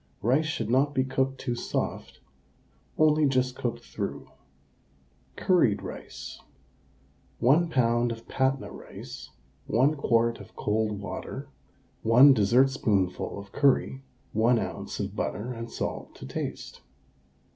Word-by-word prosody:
Rice 135 +8 +3
should 150 - -2
not 140 +3 +2
be 130 - +3
cooked 130 0 -1
too 120 - -2
soft, 120 - -4 0.8
only 155 -1 +4
just 130 -1 +1
cooked 120 -2 -3
through. - - -5 1.0
CURRIED 170 - +2
RICE. - - -8 1.0
1 155 +8 +4
lb. 120 -3 +2
of 115 0 -8
Patna 130 0 0
rice, - - -10 0.4
1 130 +7 +3
quart 115 -5 +1
of - - -13
cold 105 -1 -1
water, 100 - -6 0.5
1 125 +5 +7
dessertspoonful 110 -5 +2
of 100 0 -9
curry, 135 -1 +2 0.3
1 115 +3 +4
oz. - - -4
of - - -3
butter, 120 +5 -3
and 115 0 -6
salt - - -5
to - - -10
taste. 65 - -6
125 Hz, 120 wpm, -27 LUFS, 115-135 Hz, 1.0 s, 1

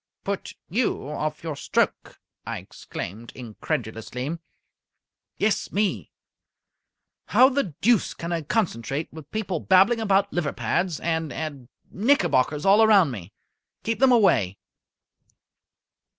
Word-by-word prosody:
"Put 200 -1 -4
you 220 - -1
off 150 +1 -3
your 160 -3 -3
stroke!" - - -1 0.2
I - - -4
exclaimed, 110 +6 -8
incredulously. 125 +3 -4 1.0
"Yes, 210 0 0
me! 205 0 -1 1.2
How 260 - +6
the 260 - -2
deuce 235 0 +3
can 170 +1 -5
I 170 -1 -1
concentrate, 150 - -2
with 155 -2 -11
people 195 -6 -2
babbling 195 +8 +4
about 200 -2 +2
liver 155 -5 -1
pads, 160 +9 -1
and 160 -2 -1
and 140 -6 -6 0.2
knickerbockers 175 - +2
all 200 +3 +6
round 195 -9 +5
me? 100 -5 -8 0.5
Keep 225 0 -1
them 265 0 +5
away!" 125 - +3
165 Hz, 115 wpm, -25 LUFS, 135-205 Hz, 1.2 s, How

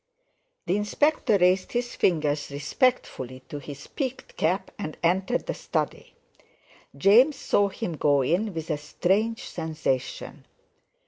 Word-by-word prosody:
The 180 +3 +1
Inspector 215 +2 +2
raised 185 0 +2
his 240 0 -1
fingers 150 -4 +1
respectfully 145 - -1
to 145 - -5
his 140 0 -9
peaked 265 -3 -5
cap, 180 +5 0
and 155 -6 -5
entered 185 +3 +1
the - - -2
study. - - -3 0.8
James 235 - +6
saw 205 -7 +2
him 170 -4 -4
go 145 -2 +3
in 185 +10 +1
with 165 -2 -4
a 150 - -1
strange 195 +9 0
sensation. 155 -6 -3
180 Hz, 125 wpm, -26 LUFS, 150-215 Hz, 0.8 s, James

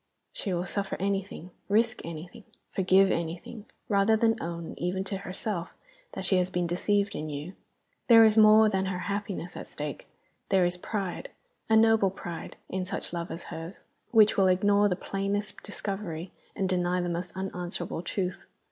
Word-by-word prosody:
She 195 - -3
will 175 0 -1
suffer 200 +1 -2
anything, 195 -2 -3 0.2
risk 225 +3 +2
anything, 170 +7 -8 0.3
forgive 190 +1 +4
anything, 170 +6 -4 0.2
rather 205 +2 +3
than 225 0 +2
own, 170 0 -5
even 180 +2 -1
to 195 0 -3
herself, 190 -1 -4 0.4
that - - -4
she 190 - +3
has 180 0 +1
been 180 -1 -1
deceived 200 +4 +1
in 155 -4 -4
you. 150 +5 -6 0.5
There 225 -2 +9
is 215 -1 +4
more 215 0 +7
than 190 -2 0
her 190 -1 -2 0.2
happiness 200 -3 -4
at - - -7
stake; 150 -1 -6 0.4
there 190 -2 +4
is 175 0 +1
pride, 190 0 -4 0.4
a 220 - +5
noble 220 -3 +5
pride, 175 -3 -7
in 185 0 -2
such 180 - -4
love 170 0 -3
as 170 - -6
hers, 165 +4 -8 0.3
which 215 -3 +5
will 195 -1 +5
ignore 205 +2 +4
the 180 - +1
plainest 195 +2 -3
discovery 195 -4 -5 0.2
and 195 -2 0
deny 180 -1 +1
the 175 - -1
most 175 +2 -4
unanswerable 180 -3 -4
truth. 185 0 -3
190 Hz, 165 wpm, -28 LUFS, 175-205 Hz, 0.5 s, There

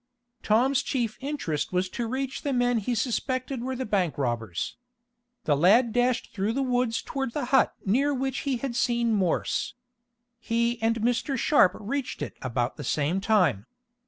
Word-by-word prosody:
Tom's 250 +5 +3
chief 235 -5 -2
interest 265 - -2
was 180 +1 +1
to 235 +3 -3
reach 265 +2 -3
the 280 - -1
men 245 -1 +2
he 240 +4 -2
suspected 255 +2 -2
were 260 +1 -3
the 260 +1 -3
bank 190 -6 0
robbers. 115 -8 -2 0.7
The 145 - +2
lad 215 - +4
dashed 245 0 +1
through 205 +2 -1
the 275 +2 0
woods 245 -2 0
toward 270 -4 -3
the 290 -4 -2
hut 265 - +4
near 265 +9 +2
which 270 -1 -1
he 275 -3 -1
had 245 -1 -4
seen 235 -2 +1
Morse. 190 +1 0 0.6
He 235 0 0
and 225 0 +1
Mr. 245 +4 0
Sharp 235 - +4
reached 255 +5 -3
it - - -6
about 125 0 -2
the 145 - -6
same 150 +8 0
time. 180 - +2
235 Hz, 165 wpm, -27 LUFS, 190-260 Hz, 0.7 s, lad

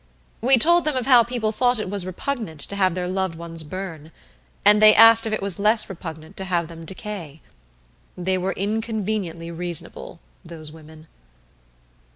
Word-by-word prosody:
We 260 +3 +6
told 345 +7 +4
them 305 -3 +1
of 255 -2 -1
how 250 -3 +6
people 235 -2 -2
thought 245 +1 +1
it 215 - -3
repugnant 195 - -4
to 200 - -1
have 185 -3 +1
their 180 -1 -3
loved 190 -2 -2
ones 165 -1 -7
burn, 160 -2 -8 0.5
and 210 +1 +6
they 215 0 +8
asked 225 +1 +7
if - - -3
it 215 - -2
was 200 -3 -2
less 215 +2 +2
repugnant 160 -4 -9
to 190 - -4
have 175 -3 -1
them 165 -1 -10
decay. 185 -5 -8 0.8
They 185 +1 -1
were 190 +2 -2
inconveniently 205 -5 -3
reasonable, 175 -1 -4 0.2
those 155 -2 -10
women. 155 0 -15
190 Hz, 165 wpm, -22 LUFS, 165-220 Hz, 0.8 s, they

